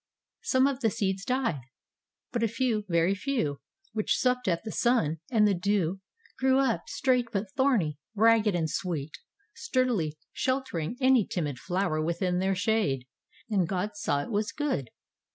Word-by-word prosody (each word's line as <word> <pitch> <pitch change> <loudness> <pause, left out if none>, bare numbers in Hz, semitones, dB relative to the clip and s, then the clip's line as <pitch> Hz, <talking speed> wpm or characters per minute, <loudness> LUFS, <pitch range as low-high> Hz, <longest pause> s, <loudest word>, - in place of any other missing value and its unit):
Some 260 0 +3
of 275 -2 0
the 225 -4 +2
seeds 195 -1 -1
died, 235 - 0 0.7
but 240 - -1
a 230 - +3
few, 225 -2 -1
very 170 +2 +3
few, 200 - -2 0.3
which 215 -1 +1
supped 250 -2 +1
of 170 -3 +3
the 220 - -5
sun 230 -11 +1
and 215 -3 +4
the 205 - +3
dew, 195 -1 0 0.4
grew 265 0 +4
up, 265 -5 +1
straight 250 -3 +1
but 195 -1 -2
thorny, 210 - +2 0.2
ragged 220 -2 +4
and 165 -2 +1
sweet, 155 -4 -3 0.3
sturdily 250 - 0 0.2
sheltering 255 - -2
any 260 -3 +5
timid 145 -7 -3
flower 175 -3 -1
within 175 +2 0
their 190 +1 +1
shade. 185 - 0 0.4
And 195 -6 +1
God 190 +3 -1
saw 145 -8 0
it - - -8
was 210 +1 0
good. 275 - -2
205 Hz, 155 wpm, -28 LUFS, 170-250 Hz, 0.7 s, any